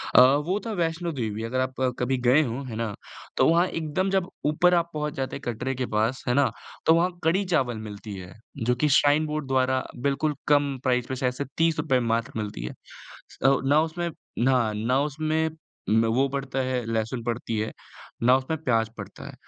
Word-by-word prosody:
अ, - - +10 0.2
वो 190 +4 0
था 225 - -3
वैष्णो 165 +1 -1
देवी। 110 -5 -3
अगर 130 +3 -1
आप 130 0 -1 0.3
कभी 130 +1 +1
गए 145 +5 +6
हों, 130 +2 -4
है 115 - -6
ना? 115 -2 -2 0.4
तो - - +5
वहाँ 170 +2 +4
एकदम 165 +4 -1
जब 190 -1 0 0.2
ऊपर 175 +4 +4
आप 170 -1 +2
पहुँच 150 -1 -2
जाते 135 -1 -3
हैं - - -7
कटरे 130 +4 -3
के 130 0 -2
पास 115 +5 0
है 125 - +3
ना? 140 +1 +3 0.3
तो 160 - +6
वहाँ 180 +2 +2
कड़ी-चावल 160 - +1
मिलती 100 0 -8
है, 90 0 -9 0.2
जो 125 0 +1
कि 150 +4 +1
श्राइन 150 +2 +3
बोर्ड 150 -2 -3
द्वारा 130 0 +2 0.2
बिल्कुल 140 +2 0
कम 145 -2 +3
प्राइज़ 125 -2 +1
पे 130 - -2
शायद 125 -1 0
से 140 +2 -4
₹30 160 -5 +2 0.2
मात्र 115 +4 -3
मिलती 105 - -4
है। - - -5 0.8
औ 135 - +3
ना 145 +2 +5
उसमें 170 +2 -2
हाँ, 125 -6 0
ना 115 +5 +1
उसमें 155 +2 0 0.4
उम, 110 +1 +4
ब - - +2
वो 135 +1 +3
पड़ता 135 -1 -3
है, 130 -1 -1
लहसुन 115 +1 -2
पड़ती 115 -1 -2
है, 110 - -2 0.5
ना 125 +2 +6
उसमें 145 +5 -3
प्याज़ 115 -3 +2
पड़ता - - -9
है, - - -9
135 Hz, 200 wpm, -26 LUFS, 120-155 Hz, 0.8 s, अ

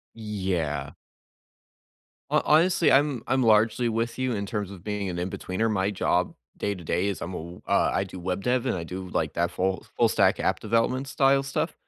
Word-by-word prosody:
Yeah. 95 -10 -2 1.4
Ho - - +4
honestly, 165 +2 +4
I'm 140 -3 +3
I'm 130 -1 +2
largely 115 +2 +3
with 115 +1 -1
you 130 -1 0
in 100 -1 -3
terms 105 -2 -3
of 95 -3 -11
being 105 -2 -2
an 90 - -4
inbetweener. 95 +4 -2
My 95 -1 +1
job, 90 -2 0 0.2
day-to-day, 95 -1 -1
is 100 - -3
I'm 90 +2 -5
a - - -3
w 85 +2 -9
uh, - - +3
I - - +1
do 95 - -9
web 90 +2 -3
dev, 125 0 +1
and - - 0
I 85 - -4
do, 95 +2 -6
like, 80 -3 -1
that 85 0 0
full 95 0 -1
full - - +4
stack - - +3
app - - 0
development 115 +5 0
style 135 0 +3
stuff. 135 0 -2
100 Hz, 190 wpm, -26 LUFS, 90-120 Hz, 1.4 s, Ho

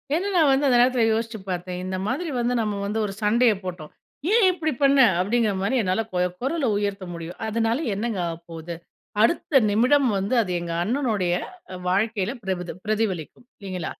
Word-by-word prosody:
ஏனா, 370 +4 -1
நான் 310 -5 +5
வந்து 275 +2 +2
அந்த 245 - +4
நேரத்துல 250 -2 +3
யோசிச்சுப் 220 -3 -4
பாத்தேன். 180 0 -4
"இந்த 185 0 -3
மாரி 305 +9 -2
வந்து 240 +1 0
நம்ம 210 -2 -2
வந்து 215 +2 -2
ஒரு 195 - -4
சண்டைய 225 +2 +4
போட்டோம். 175 -4 -7 0.4
ஏன் 450 -3 +5
இப்டி 315 -4 -2
பண்ண?" 275 0 +5 0.2
அப்படிங்கிற 215 +1 +1
மாரி 200 +7 0
என்னால 185 +4 0
கு 180 - 0 0.2
குரல 275 +1 0
உயர்த்த 200 -2 -2
முடியும். 170 +1 -8
அதனால 225 +1 0 0.2
என்னங்க 220 -1 -2
ஆவப்போகுது? 165 0 -7 0.5
அடுத்த 275 +1 +3
நிமிடம் 250 +5 +3
வந்து, 195 +6 -2
அது 185 -5 -3
எங்க 170 -1 -4
அண்ணனுடைய 215 -6 0 0.6
வாழ்க்கையில 210 +2 0
பிரபதி 180 -3 -3
பிரதிபலிக்கும். 215 -1 -2
இல்லைங்களா? 185 -4 -5
215 Hz, 165 wpm, -24 LUFS, 185-250 Hz, 0.6 s, நான்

